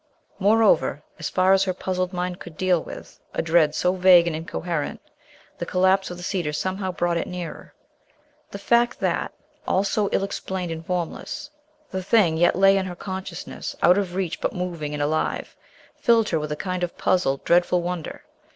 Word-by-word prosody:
Moreover, 200 -9 +3 0.2
as 165 - -3
far 185 +1 +3
as 195 0 +4
her 185 -2 -1
puzzled 185 -1 -2
mind 180 0 -3
could 165 -3 -11
deal 185 -3 +2
with - - -10 0.2
a - - 0
dread 160 -2 +3
so 180 - +2
vague 180 -2 +6
and 170 -2 -1
incoherent, 165 -1 -3 0.6
the - - -2
collapse 190 +1 +2
of 175 - -7
the 175 - -9
cedar 175 -5 -1
somehow 185 +4 -2
brought 175 0 0
it - - -2
nearer. 180 -2 -7 0.7
The - - -7
fact 235 +4 +2
that, - - 0 0.4
all 190 - +2
so 205 0 0
ill - - +1
explained 190 -3 -4
and 165 0 -5
formless, 180 - -4 0.4
the 190 - -2
thing 185 -4 +3
yet 175 +2 +3
lay 195 +1 +5
in 190 -1 -1
her 180 - -6
consciousness, 185 -1 -6
out 180 +3 +6
of 185 -3 -3
reach 185 -3 -2
but - - -1
moving 170 -5 -4
and 145 - -1
alive, 155 +2 -1 0.4
filled 230 -3 +3
her 165 - +1
with 150 0 -4
a - - -1
kind 185 +3 -3
of 175 -1 -3
puzzled, 140 -7 +1
dreadful 175 0 +3
wonder. 175 -2 -5
180 Hz, 185 wpm, -24 LUFS, 170-190 Hz, 0.7 s, vague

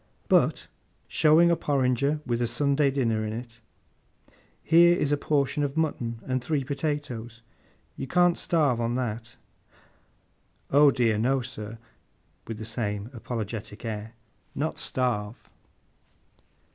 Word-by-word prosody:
'But,' - - +2 0.4
showing 165 +3 +5
a - - +4
porringer 140 0 +1
with 120 0 -1
a 120 - +1
Sunday 140 +4 +2
dinner 115 -5 0
in 110 0 -3
it; 120 0 -8 1.0
'here 170 +1 +6
is 145 - 0
a - - +4
portion 145 0 0
of 145 +1 -2
mutton, 120 -8 -1
and 130 -1 -1
three 150 -2 0
potatoes. 140 -5 -4 0.5
You - - -5
can't 175 +3 +3
starve 145 -8 +1
on 115 +1 -1
that?' 120 -2 -4 1.4
'Oh 145 +1 +7
dear 115 -5 +1
no, 130 +4 +2
sir,' 115 -3 -7 0.7
with 115 - -5
the 110 - -7
same 105 0 -3
apologetic 110 -2 -6
air. 110 +1 -5 0.4
'Not 155 +3 -2
starve. 120 -4 -1
125 Hz, 125 wpm, -27 LUFS, 115-145 Hz, 1.4 s, Oh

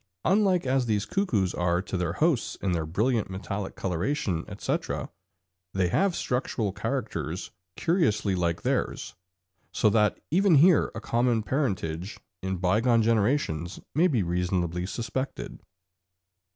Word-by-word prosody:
Unlike 190 -3 +3
as 130 -1 +1
these 105 -2 +1
cuckoos 115 - 0
are 85 0 +1
to 95 - -5
their 90 -2 -1
hosts 150 - +1
in 95 - -2
their 80 -3 -1
brilliant 110 +5 0
metallic 100 +1 -5
coloration, 90 - -1
etc., 100 -1 -3 0.6
they 95 -2 +2
have 195 - +2
structural 125 -4 -1
characters 95 - -3 0.2
curiously 160 - +1
like 85 -2 -1
theirs, - - -1 0.6
so 110 - +3
that 105 -1 +2
even 190 +1 +4
here 165 +3 +5
a 115 - -5
common 120 -1 +1
parentage 95 - -2 0.2
in 95 0 -2
bygone 110 +6 +3
generations 105 - +1
may 165 +6 +4
be 125 - +1
reasonably 90 0 -1
suspected. 130 +5 -4
105 Hz, 125 wpm, -27 LUFS, 90-135 Hz, 0.6 s, here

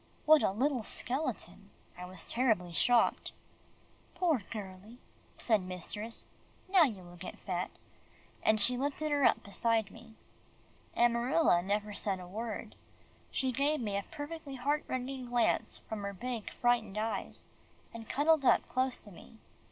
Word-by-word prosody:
What 310 0 +7
a - - +3
little 255 +6 +1
skeleton! 255 +7 -3 0.3
I 180 - -7
was 185 -2 -6
terribly 220 -9 +1
shocked. 240 +8 +3 0.8
"Poor 340 - +2
girlie," 205 +1 -8 0.4
said 220 -4 +3
mistress, 185 +5 -5 0.4
"now 375 -1 +5
you 210 -9 -4
will 175 0 -13
get 180 - -8
fat," 180 -2 -3 0.7
and 220 0 +3
she 250 +4 +2
lifted 290 +2 -1
her 290 -1 +2
up - - +4
beside 220 0 +1
me. 225 -1 -14 0.8
Amarilla 240 - +4
never 205 +2 -1
said 195 -2 -1
a 180 - -8
word. 220 +3 -5 0.6
She 260 -1 0
gave 285 +4 +1
me 210 -4 -2
a 200 - -1
perfectly 290 -2 -6
heart 285 +4 0
rending 255 0 -3
glance 240 -1 +1
from 220 -2 -4
her 200 0 -4
big 235 +2 -4
frightened 230 -4 +1
eyes, 215 -2 -3 0.5
and 225 -1 -9
cuddled 305 +1 +3
up - - +4
close 255 0 0
to 205 - -13
me. 210 +5 -14
230 Hz, 145 wpm, -32 LUFS, 200-265 Hz, 0.8 s, What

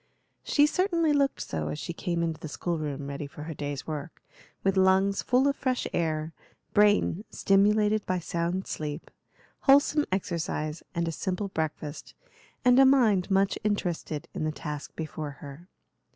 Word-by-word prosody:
She 290 - +4
certainly 335 -1 +2
looked 280 -1 +1
so 80 -2 -3
as 75 0 -3
she 170 - -5
came 170 -1 -2
into 165 -2 -2
the - - -6
school 170 +2 -3
room 145 -2 -4
ready 140 +1 -5
for 150 +1 -10
her 160 +1 -5
day's 145 -2 -5
work, 155 0 -6 0.4
with 195 0 +2
lungs 190 +1 +3
full 255 +3 +3
of 280 - +2
fresh 255 -3 -1
air, 160 -1 -1 0.4
brain 205 -2 +3
stimulated 210 +2 +3
by 185 - +1
sound 170 +2 -2
sleep, 150 +1 -5 0.5
wholesome 285 +2 +4
exercise, 160 -4 -2
and 170 0 0
a - - 0
simple 190 +4 -3
breakfast, 155 -3 -4 0.5
and 250 +1 +6
a - - +9
mind 235 -9 +4
much 195 0 +2
interested 175 -7 -2
in - - -3
the 155 - 0
task 150 -1 -6
before 155 -2 -5
her. 145 +6 -11
175 Hz, 160 wpm, -28 LUFS, 155-210 Hz, 0.5 s, a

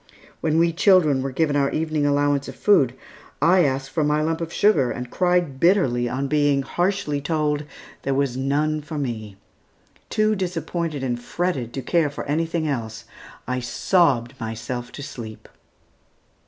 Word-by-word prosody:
When 160 -1 0
we 170 0 +3
children 165 -7 +4
were 135 - -2
given 145 +2 +1
our 140 -1 +2
evening 155 -2 0
allowance 145 -1 +1
of - - -8
food, 135 - +3 0.4
I 175 +3 +5
asked 135 -1 -1
for 160 - 0
my 150 +1 +1
lump 160 +1 -1
of 165 0 -4
sugar, 165 - +3
and 125 0 -5
cried 175 -6 +1
bitterly 135 -10 +3
on 135 +3 -2
being 145 -1 +2
harshly 175 -1 -1
told 150 -1 -1 0.4
there 135 0 -1
was 135 -3 0
none 150 +3 0
for 155 +1 -7
me. 110 -7 -4 0.7
Too 215 0 +2
disappointed 170 -5 -3
and 120 -2 -2
fretted 135 -4 -2
to 135 - -4
care 165 +2 +2
for 145 - -6
anything 160 +2 -1
else, 115 -5 -4 0.4
I 125 +1 -1
sobbed 125 -1 +1
myself 115 +2 -5
to 145 - -7
sleep. 110 -5 -9
145 Hz, 155 wpm, -23 LUFS, 130-165 Hz, 0.7 s, I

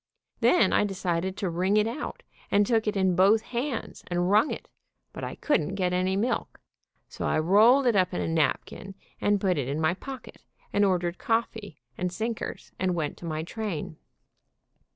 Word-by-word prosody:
Then 360 - +4
I - - +4
decided 185 -2 -2
to 190 - -1
wring 185 +5 +1
it 210 - +4
out, 235 +6 -5 0.3
and 205 +1 +4
took 225 0 +1
it 210 -1 0
in 190 -2 +2
both 200 +5 +4
hands 250 +1 -4
and 175 +1 0
wrung 215 +7 +4
it, - - -6 0.5
but - - -7
I - - -4
couldn't 190 - 0
get 180 -2 0
any 185 +1 +1
milk, 230 +5 -2 0.5
so - - -6
I - - +1
rolled 215 - +5
it 240 -3 +3
up 185 -2 +3
in 180 - -3
a - - -1
napkin 165 +5 -1 0.3
and 205 0 +2
put 185 -5 +1
it 130 - -2
in 140 +3 -2
my 160 +2 +2
pocket, 265 +7 -9 0.3
and 205 - +3
or 190 -2 +3
dered 175 0 -4
coffee 225 - -2 0.2
and 180 0 -1
sinkers, 225 +4 -4
and 185 -1 0
went 155 -4 -2
to - - -10
my 155 -1 -3
train. 170 -5 -5
190 Hz, 190 wpm, -27 LUFS, 175-220 Hz, 0.5 s, rolled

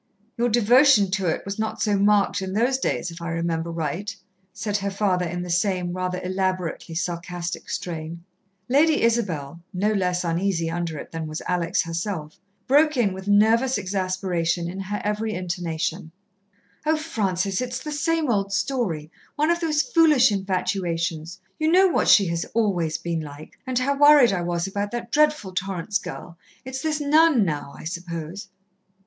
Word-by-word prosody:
"Your 240 +1 +1
devotion 240 -2 +5
to 190 -2 0
it 160 - -1
was 200 +1 -5
not 220 0 -2
so 210 -2 +1
marked 200 0 +3
in 190 0 -4
those 245 +5 +1
days, 180 - -1
if 165 +1 -10
I 170 - -4
remember 165 0 -2
right," 170 +6 -3 0.4
said 210 +2 -2
her 200 0 -2
father 195 -3 0
in 175 +1 -4
the 180 - -5
same, 180 -1 0
rather 180 0 -2
elaborately 185 -3 -2
sarcastic 175 0 -4
strain. 165 -1 -5 0.4
Lady 295 +3 +3
Isabel, 175 -10 0
no 205 +4 0
less 180 -3 0
uneasy 170 -1 0
under 170 -2 -3
it - - -9
than 165 -1 -4
was 155 0 -5
Alex 175 0 0
herself, 165 -2 -4 0.3
broke 300 +2 +4
in 210 -6 +2
with 190 +1 -8
nervous 225 +5 +4
exasperation 185 -3 -1
in 185 +3 -6
her 205 +2 -3
every 215 +1 -1
intonation: 170 -2 -3 0.7
"Oh, 315 +1 +2
Francis, 195 - -1
it 250 - -2
is 245 +1 -5
the 300 - -6
same 320 +1 0
old 200 -4 0
story 195 - -1 0.2
one 305 +3 +2
of 340 - +1
those 310 -3 +1
foolish 320 - +4
infatuations. 180 -3 -2 0.2
You 310 +1 +2
know 375 +2 +6
what 265 -7 +1
she 200 - +7
has 170 0 -1
always 180 -8 +1
been 170 -1 -3
like, 150 0 -11
and 255 -1 -1
how 275 +2 0
worried 290 -7 +7
I 180 - -1
was 175 0 -1
about 200 +1 -3
that 235 -1 -5
dreadful 300 -9 +2
Torrance 190 +2 -2
girl. 170 -3 -9 0.3
It's 260 0 -5
this 310 0 -1
nun 295 -5 +4
now, 145 -4 -4
I - - -11
suppose." 170 +2 -6
195 Hz, 170 wpm, -24 LUFS, 170-235 Hz, 0.7 s, she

